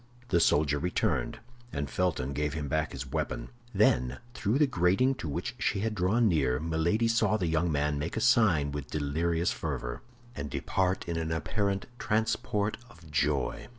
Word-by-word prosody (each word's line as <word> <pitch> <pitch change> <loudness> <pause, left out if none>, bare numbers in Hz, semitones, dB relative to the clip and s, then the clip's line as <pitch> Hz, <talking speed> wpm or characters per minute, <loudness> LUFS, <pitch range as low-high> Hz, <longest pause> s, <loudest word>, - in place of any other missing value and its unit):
The 85 - +3
soldier 75 -3 +3
returned, 70 -7 0 0.3
and 70 0 -3
Felton 70 -3 -1
gave 75 +1 -1
him 75 -2 -3
back 80 +2 0
his 70 0 -5
weapon. 75 -5 -2 0.2
Then, 60 +1 +2 0.2
through 110 +1 0
the 150 - +5
grating 110 +3 +2
to 80 - -3
which 70 - -3
she 100 - 0
had 110 0 -1
drawn 105 +5 +2
near, 70 -8 +2
Milady 85 +8 +1
saw 110 -2 +2
the 95 - -1
young 80 +1 +1
man 75 0 0
make 80 +8 -3
a - - +2
sign 110 - +4
with 70 0 -5
delirious 80 +4 0
fervor, - - -4 0.3
and 70 0 -4
depart 95 +6 -1
in 85 -1 -2
an 80 -1 -2
apparent 100 +4 -1
transport 110 -1 0
of 85 -9 -16
joy. 75 -2 0
80 Hz, 170 wpm, -29 LUFS, 75-100 Hz, 0.3 s, the